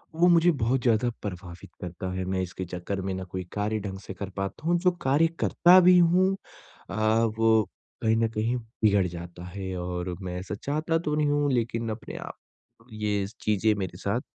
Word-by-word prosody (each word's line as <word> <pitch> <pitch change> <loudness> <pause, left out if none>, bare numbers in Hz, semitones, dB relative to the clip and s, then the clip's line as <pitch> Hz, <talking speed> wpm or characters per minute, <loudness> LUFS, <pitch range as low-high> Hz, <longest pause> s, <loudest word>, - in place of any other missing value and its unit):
वो 175 +2 +4
मुझे 170 0 +5
बहुत 130 -2 0
ज़्यादा 120 0 +2
प्रभावित 90 -2 -7
करता 90 +1 -5
है। 95 0 -3
मैं 95 0 -1
इसके 95 0 -5
चक्कर 90 +3 -4
में 95 0 -3
ना 95 0 -4
कोई 95 0 -5
कार्य 105 +1 -1
ढंग 95 -2 -6
से 95 - -8
कर 95 +1 -6
पाता 100 +10 -4
हूँ 175 0 +3
जो 180 0 +3
कार्य 145 +5 +3
करता 180 +2 +6
भी 180 0 +7
हूँ 180 +3 +4 0.5
अ, 100 - -5 0.4
वो 110 -1 +4 0.4
कहीं 110 0 +3
न 115 - +2
कहीं 115 +2 -1
बिगड़ 110 -4 +1
जाता 85 0 -8
है 95 +1 -5
और 90 0 -3
मैं 90 -1 -5
ऐसा 95 +3 -5
चाहता 155 +3 0
तो 150 -2 -1
नहीं 150 -1 +2
हूँ, 145 -1 +2
लेकिन 115 -1 -1
अपने 110 +1 -6
आप - - -8 0.6
ये 105 -2 -1
स 110 - -15
चीज़ें 105 +1 +2
मेरे 95 -3 -4
साथ - - -1
105 Hz, 195 wpm, -27 LUFS, 95-140 Hz, 0.6 s, भी